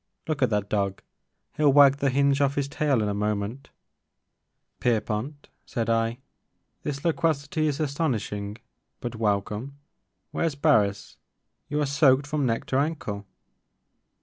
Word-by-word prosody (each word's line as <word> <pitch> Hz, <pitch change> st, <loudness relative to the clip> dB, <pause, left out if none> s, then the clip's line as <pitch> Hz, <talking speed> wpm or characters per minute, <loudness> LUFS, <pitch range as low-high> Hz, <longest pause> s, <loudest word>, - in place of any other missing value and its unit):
Look 155 Hz, -3 st, -2 dB
at 130 Hz, -, +4 dB
that 105 Hz, -2 st, 0 dB
dog, 100 Hz, -2 st, -1 dB, 0.5 s
he 155 Hz, -, -4 dB
'11 145 Hz, -2 st, +5 dB
wag 140 Hz, -1 st, +7 dB
the 140 Hz, -1 st, +1 dB
hinge 140 Hz, +1 st, +2 dB
off 140 Hz, 0 st, +2 dB
his 140 Hz, -1 st, 0 dB
tail 140 Hz, -5 st, +1 dB
in -, -, 0 dB
a 105 Hz, -, 0 dB
moment 105 Hz, +5 st, -2 dB, 0.5 s
" -, -, -53 dB
Pierpont," 120 Hz, +5 st, -1 dB, 0.2 s
said 115 Hz, -3 st, -2 dB
I, 115 Hz, +1 st, +1 dB, 0.6 s
"this 145 Hz, 0 st, -4 dB
loquacity 155 Hz, -2 st, +1 dB
is 145 Hz, 0 st, -1 dB
astonish 145 Hz, -5 st, -1 dB
ing 100 Hz, +1 st, -5 dB, 0.4 s
but 120 Hz, -1 st, -5 dB
welcome. 105 Hz, +5 st, -1 dB, 0.5 s
Where 165 Hz, -, 0 dB
's 145 Hz, -, -8 dB
Barris? 110 Hz, -10 st, +2 dB, 0.5 s
You 150 Hz, -, -1 dB
are -, -, +2 dB
soaked 140 Hz, -1 st, +4 dB
from 145 Hz, -2 st, 0 dB
neck 115 Hz, -1 st, -1 dB
to -, -, +4 dB
ankle." 125 Hz, -10 st, -3 dB
135 Hz, 150 wpm, -26 LUFS, 105-145 Hz, 0.6 s, wag